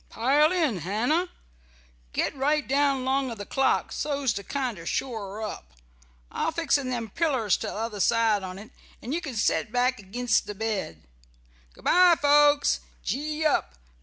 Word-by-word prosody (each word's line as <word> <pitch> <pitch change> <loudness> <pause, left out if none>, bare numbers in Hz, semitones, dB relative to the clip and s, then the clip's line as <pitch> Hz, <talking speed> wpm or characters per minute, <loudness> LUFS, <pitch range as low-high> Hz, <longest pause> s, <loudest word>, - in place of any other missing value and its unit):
"Pile 285 +7 +3
in, 310 - +1
Hannah. 245 - 0 0.8
Get - - -1
right 290 +2 0
down 275 -1 +1
'long 265 0 +1
o' 230 - -5
the 205 -1 -7
clock, 270 +4 +1
so's 280 -5 -1
to 200 - -5
kinder 250 -10 -3
shore 215 -5 -3
it 220 - -3
up. 65 - -9 0.6
I'll - - -1
fix 325 -3 +1
in 275 -3 -1
them 235 -4 -4
pillers 260 - +1
t'other 215 -1 -4
side 225 0 +3
on't, 190 +3 -8 0.3
and 250 - -4
you 340 - -1
can 275 -7 -6
set 215 +1 0
back 250 0 +1
ag'inst 215 +4 0
the 210 - -5
bed. 195 - -3 0.7
Good - - -18
bye, 360 -1 +6
folks! 290 0 +4 0.2
Gee 305 +3 -2
up! 70 - +1
255 Hz, 160 wpm, -26 LUFS, 215-290 Hz, 0.8 s, bye